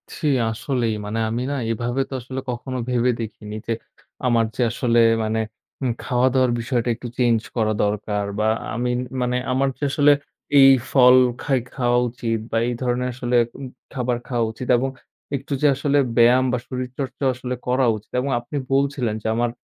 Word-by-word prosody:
জি 160 - -6 0.2
আসলেই। 115 -1 -1
মানে 105 +2 -3
আমি 115 +2 -2
না - - -1 0.2
এভাবে 120 +4 -1
তো - - -7
আসলে 130 +2 -5
কখনো 130 +2 -4
ভেবে 125 0 +2
দেখিনি। 105 -1 -7
যে 115 - +1 0.5
আমার 115 -2 +3
যে - - -2
আসলে 120 0 +2 0.2
মানে 110 +1 -1 0.4
উ - - 0 0.2
খাওয়া 125 0 +2
দাওয়ার 130 -2 +3
বিষয়টা 120 0 -1
একটু 120 +2 -8
চেঞ্জ 120 -3 +3 0.2
করা 110 -2 +1
দরকার 105 0 -1
বা 110 - +2 0.3
আমি 125 +2 -1 0.3
মানে 125 0 0
আমার 135 +1 +2
যে - - -8
আসলে 145 +1 +5 0.5
এই 135 0 +9 0.2
ফল 125 -2 +7 0.3
খাই, 135 -3 +1 0.2
খাওয়া 120 -2 +2
উচিত 115 -1 -2
বা 115 - +1
এই 120 - -1
ধরনের 125 0 0
আসলে 125 0 -2 0.2
উ - - -8 0.3
খাবার 125 -2 -1
খাওয়া 120 -3 0
উচিত 125 +3 -7
এবং 135 +3 -1 0.5
একটু 140 +2 -4
যে 150 - +5
আসলে 140 +1 +1 0.2
ব্যায়াম 120 +2 +6
বা - - +2
শরীরচর্চা 130 +1 -5
আসলে 125 0 -4
করা 125 +1 +2
উচিত 105 - -12
এবং 140 +1 -2
আপনি 120 +5 -9 0.2
বলছিলেন 135 -5 +1
যে, - - -2
আমার 120 0 +1
125 Hz, 175 wpm, -22 LUFS, 115-130 Hz, 0.5 s, এই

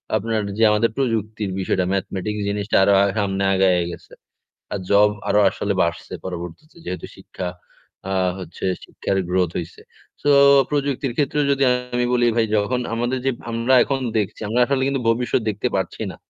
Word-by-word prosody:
আপনার 110 +1 0 0.2
যে 115 - +2
আমাদের 105 +2 +2
প্রযুক্তির 110 -5 -1
বিষয়টা 95 -1 0
ম্যাথমেটিক্স 100 +2 -3
জিনিসটা 100 +1 -2
আরো 100 - +4
হা 100 - +4
সামনে 100 -1 -1
আগায়ে 95 -2 +3
গেছে। - - -12 0.6
আর 100 - -2
জব 105 +1 +5 0.2
আরো 105 - +4
আসলে 100 +2 -2
বাড়ছে 85 0 -2
পরবর্তীতে 90 - -7
যেহেতু 90 - -5
শিক্ষা 90 - -7 0.6
আ - - 0 0.3
হচ্ছে 85 -1 -7 0.2
শিক্ষার 95 - -3
growth 90 -2 +1
হইছে। 85 -1 -7 0.4
সো 145 - +1 0.4
প্রযুক্তির 140 -3 -1
ক্ষেত্রেও 145 0 +1
যদি 140 0 +1 0.3
আমি 125 0 +1
বলি 120 -1 +3
ভাই 115 -1 +3
যখন 105 +4 +1
আমাদের 120 +3 -1
যে 135 - +3 0.2
আমরা 115 +3 +1
এখন 135 -1 -1 0.2
দেখছি 105 -3 -2
আমরা 115 +4 0
আসলে 135 0 0
কিন্তু 135 -2 -1
ভবিষ্যৎ 120 +2 +1
দেখতে 105 -1 -1
পারছি - - -3
না। - - -11
105 Hz, 165 wpm, -21 LUFS, 95-125 Hz, 0.6 s, জব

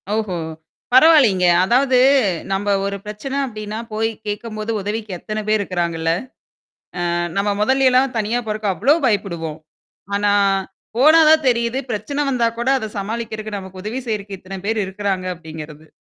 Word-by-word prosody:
ஓஹோ! 215 -5 -2 0.6
பரவாயில்லங்க. 255 - +6 0.2
அதாவது 255 +5 +3 0.5
நம்ப 200 +1 -1 0.2
ஒரு 200 0 -2
பிரச்சனை 240 +7 -5
அப்படின்னா, 215 -2 -6
போய் 225 +1 0 0.2
கேட்கும்போது 215 +1 -4
உதவிக்கு 210 +1 -4
எத்தனை 215 +3 -4
பேர் 215 0 +2
இருக்கிறாங்கல்ல. 170 -4 -1 1.0
ஆ - - 0 0.2
நம்ம 200 0 +1
மொதல 265 +4 +3
எல்லாம் 255 0 +2
தனியா 220 +3 0
போறக்கு 215 -1 -2
அவ்ளோ 275 - +3
பயப்படுவோம். 170 -8 -1 0.6
ஆனா, 205 0 +2 0.7
போனா 310 +5 +7
தான் 315 -1 +5
தெரியுது. 235 +1 +1
பிரச்சனை 280 +7 -3
வந்தா 240 -3 +2
கூட 240 +2 -1
அத 220 - -5
சமாளிக்குறக்கு 215 0 -4
நமக்கு 190 -1 -9
உதவி 235 +5 -3
செய்யறக்கு 200 -3 -4
இத்தனை 190 +1 -8
பேர் 220 +1 0
இருக்கிறாங்க 190 -1 -2
அப்படின்கிறது. 160 -2 -10
215 Hz, 140 wpm, -20 LUFS, 195-235 Hz, 1.0 s, போனா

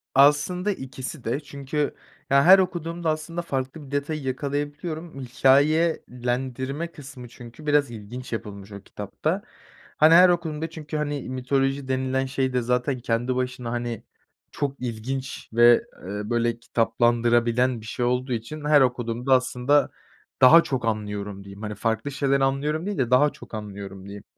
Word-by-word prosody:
Aslında 150 +8 +4
ikisi 130 -3 -7
de 120 +5 -1
çünkü, 145 0 -3 0.3
ya, 140 0 +5
her 190 +2 +9
okuduğumda 170 -2 -2
aslında 155 +2 -3
farklı 140 -1 -4
bir 135 - -14
detayı 145 +1 -2
yakalayabiliyorum. 145 +4 -4
Hikâyelendirme 135 0 +1
kısmı 135 -5 -11
çünkü 120 +4 -13
biraz 145 -3 +2
ilginç 120 +3 -8
yapılmış 100 -2 -6
o 100 0 -8
kitapta. 130 - -3 0.6
Hani, 155 +2 +6
her 180 +2 +8
okuduğumda 160 -2 -1
çünkü, 155 -1 -6
hani, 145 -3 -3
mitoloji 135 +1 -1
denilen 130 0 0
şey 130 -1 -1
de 125 - +1
zaten 125 +2 0
kendi 120 +2 -1
başına, 125 -1 -3
hani, 120 -2 -3 0.5
çok 140 -1 -2
ilginç 125 +3 -5
ve, 120 +1 +7 0.3
eee, 105 +2 -5
böyle, 120 0 0
kitaplaştırılabilen 120 +1 +2
bir - - -12
şey 120 +2 -2
olduğu 125 +1 0
için 145 +7 -5
her 150 -1 +6
okuduğumda 125 0 +1
aslında 130 +2 +2 0.5
daha 160 +6 +9
çok 130 -3 -2
anlıyorum 105 -2 -3
diyeyim. 100 +1 -11
Hani, 105 -1 -4
farklı 115 +6 -1
şeyler 140 0 +1
anlıyorum 145 +5 0
değil 205 -2 -3
de 125 -3 0
daha 145 +4 +5
çok - - -15
anlıyorum 100 -3 -7
diyeyim. 100 0 -9
130 Hz, 150 wpm, -24 LUFS, 120-145 Hz, 0.6 s, her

